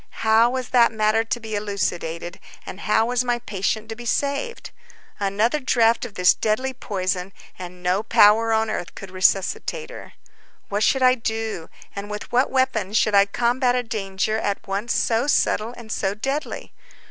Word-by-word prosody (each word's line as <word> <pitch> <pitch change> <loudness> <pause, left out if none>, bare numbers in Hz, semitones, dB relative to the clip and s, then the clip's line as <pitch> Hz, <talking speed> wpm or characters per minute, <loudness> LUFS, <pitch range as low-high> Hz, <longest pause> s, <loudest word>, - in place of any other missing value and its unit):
How 220 +2 +5
was 255 0 -4
that 240 -2 +4
matter 220 0 +2
to 225 +1 -3
be 220 -1 -7
elucidated, 175 -4 -3 0.3
and 190 - -8
how 215 +2 +2
was 245 +1 0
my 245 -1 0
patient 215 0 -3
to 225 - -5
be 240 +1 -8
saved? 290 - -2 0.5
Another 210 +8 +1
draught 235 -3 +2
of 220 -4 -10
this 180 -1 +5
deadly 255 +5 -1
poison, 185 -5 -3 0.3
and 180 0 -9
no 180 +3 +1
power 220 +1 +5
on 220 0 +1
earth 175 -4 -5
could 195 -2 -9
resuscitate 195 - 0
her. - - -11 0.6
What 205 +1 -1
should 265 +3 +2
I 255 0 +6
do, 220 -7 -4 0.3
and 200 +1 -6
with 210 0 -7
what 250 +2 +2
weapons 225 -6 0
should 215 - +2
I 200 0 +6
combat 245 +4 +1
a 250 - 0
danger 215 -1 -2
at 200 -1 -3
once 200 +4 -2
so 230 +4 +1
subtle 230 -5 +1
and 225 -2 -10
so 195 -2 -1
deadly? 275 +7 -4
220 Hz, 170 wpm, -22 LUFS, 200-240 Hz, 0.6 s, I